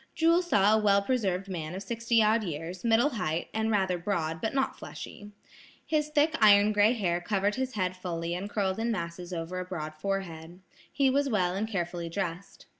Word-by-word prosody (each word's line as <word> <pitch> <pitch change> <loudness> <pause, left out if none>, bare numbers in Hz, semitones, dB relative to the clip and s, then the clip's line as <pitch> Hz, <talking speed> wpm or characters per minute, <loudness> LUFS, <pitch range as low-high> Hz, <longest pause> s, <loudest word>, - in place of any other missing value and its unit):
Jewel 335 +2 +4
saw 210 - +3
a 220 - +4
well 200 -1 +4
preserved 200 -6 -1
man 170 -3 -5
of 195 - -5
sixty 230 +1 +1
odd 220 +1 +3
years, 170 +1 -5
middle 235 +5 +3
height, 175 - -2
and 220 0 0
rather 190 -4 +1
broad, 165 -4 -2
but 220 - -1
not 270 -1 0
fleshy. 205 - -9 0.6
His 300 -1 0
thick 300 +2 +2
iron 205 0 +7
gray 210 +2 +4
hair 175 -7 -1
covered 200 +2 0
his 260 0 -3
head 185 -2 -1
fully 170 -2 -4
and 190 +4 -4
curled 195 -1 -1
in 230 +1 0
masses 175 -2 -5
over 175 +1 -4
a - - -2
broad 155 -4 -5
forehead. 170 -1 -4 0.3
He 275 -2 +2
was 280 +1 +1
well 185 -6 +1
and 205 +3 -2
carefully 175 -4 -3
dressed. 175 0 -5
195 Hz, 190 wpm, -29 LUFS, 175-225 Hz, 0.6 s, iron